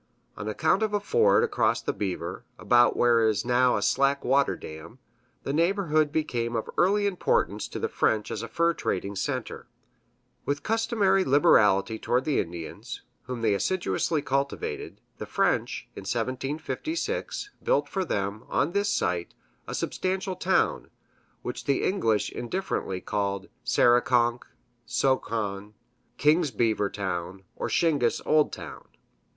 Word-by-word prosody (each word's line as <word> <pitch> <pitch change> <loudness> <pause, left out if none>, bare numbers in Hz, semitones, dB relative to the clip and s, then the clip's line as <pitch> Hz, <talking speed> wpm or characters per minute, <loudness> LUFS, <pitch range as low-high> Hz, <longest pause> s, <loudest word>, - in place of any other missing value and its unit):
On 105 - -6
account 155 - +1
of 215 -1 0
a - - +2
ford 460 - +3
across 430 -3 +1
the - - -2
Beaver, 90 -3 -4
about 120 0 +4
where 120 -1 +4
is 110 0 0
now 125 +1 +3
a - - -2
slack 140 0 +2
water 135 +2 +3
dam, 80 +10 -10 0.5
the 135 - -2
neighborhood 160 -3 +2
became 120 -7 -1
of 110 - -2
early 205 +3 +3
importance 195 -3 0
to - - -7
the - - -1
French 105 -1 0
as - - -3
a 115 - -5
fur 170 +9 +1
trading 100 - -3
center. 100 - -4 0.8
With 145 +1 -2
customary 215 -4 +2
liberality 110 - +4
toward 125 +2 0
the 150 -3 +1
Indians, 85 -2 -6 0.2
whom 120 -1 -5
they 110 -2 +3
assiduously 145 - 0
cultivated, 415 - -3 0.2
the - - -5
French, - - 0
in - - -7
1756, 160 - -3
built - - +1
for 190 - -2
them, 100 - -3
on 145 +4 +1
this 200 +2 +1
site, 85 - -1 0.3
a - - -4
substantial 190 0 -2
town, - - +1 0.5
which 125 0 -5
the 140 -2 +1
English 110 - +1
indifferently 120 - -3
called 100 -2 -2
Sarikonk, 120 0 +3 0.4
Sohkon, 110 -5 -1 0.4
King 155 +4 +4
Beaver's 110 -3 +1
Town, 95 -1 -4
or - - -3
Shingis 145 -8 +2
Old 155 -1 +3
Town. - - -9
130 Hz, 135 wpm, -27 LUFS, 105-180 Hz, 0.8 s, about